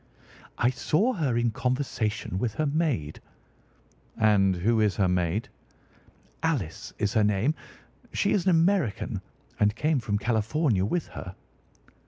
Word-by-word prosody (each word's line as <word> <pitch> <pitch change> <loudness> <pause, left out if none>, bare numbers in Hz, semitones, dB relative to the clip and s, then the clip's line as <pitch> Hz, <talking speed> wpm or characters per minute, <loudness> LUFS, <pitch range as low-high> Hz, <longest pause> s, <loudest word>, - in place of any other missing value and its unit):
"I 120 - +3
saw 205 - +1
her 140 - 0
in 120 -1 +1
conversation 115 -6 -2
with 110 -1 -2
her 155 - 0
maid." 140 - -1 1.0
"And 100 -4 +4
who 110 +6 +1
is 105 -3 +2
her 100 - +2
maid?" 90 +3 0 0.9
"Alice 130 - -2
is 105 +1 0
her 110 -3 +3
name. 105 +8 +2 0.6
She - - +1
is 190 -3 +1
an - - +4
American 170 - +1 0.4
and 105 +1 +3
came 150 +2 +1
from 105 -3 -1
California 110 - +1
with 170 +10 -1
her." 95 0 -8
115 Hz, 135 wpm, -27 LUFS, 100-150 Hz, 1.0 s, And